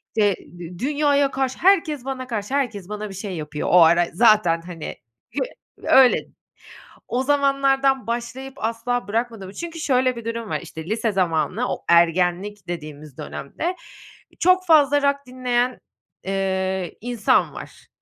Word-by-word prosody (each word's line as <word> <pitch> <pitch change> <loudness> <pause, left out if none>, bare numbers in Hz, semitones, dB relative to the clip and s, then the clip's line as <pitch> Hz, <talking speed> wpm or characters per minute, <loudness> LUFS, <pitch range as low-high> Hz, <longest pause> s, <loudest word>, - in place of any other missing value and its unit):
işte, 205 -3 +3 0.2
dü 175 0 -9
dünyaya 285 0 +2
karşı, 265 -1 -2
"Herkes 320 -8 +3
bana 260 -2 -4
karşı, 220 +1 -4
herkes 215 -9 -2
bana 210 0 -5
bir - - -8
şey 195 -1 -5
yapıyor." 150 -1 -4
O 180 -1 +7
ara 170 +1 +5
zaten, 205 -5 +4
hani, 170 -2 -7 0.4
hi - - 0 0.4
öyle, 260 -2 +5 0.8
o 250 +2 -1
zamanlardan 275 -2 +2
başlayıp 240 +3 -4
asla 230 -1 -2
bırakmadın 225 -2 -2
mı? 190 - -11
Çünkü 335 +3 -6
şöyle 255 -4 +2
bir 235 -1 -8
durum 230 -1 -4
var, 155 -1 -1
işte, 160 -1 -9
lise 220 +3 -1
zamanını 185 +5 0
o - - -8
ergenlik 180 +3 +2
dediğimiz 155 -4 -7
dönemde 330 - -4 0.6
çok 370 +1 +4
fazla 290 -3 +5
rock 280 0 +2
dinleyen, 250 0 -1 0.5
eee, 190 -2 -2
insan 240 -2 +1
var. - - -11
230 Hz, 145 wpm, -22 LUFS, 185-270 Hz, 0.8 s, O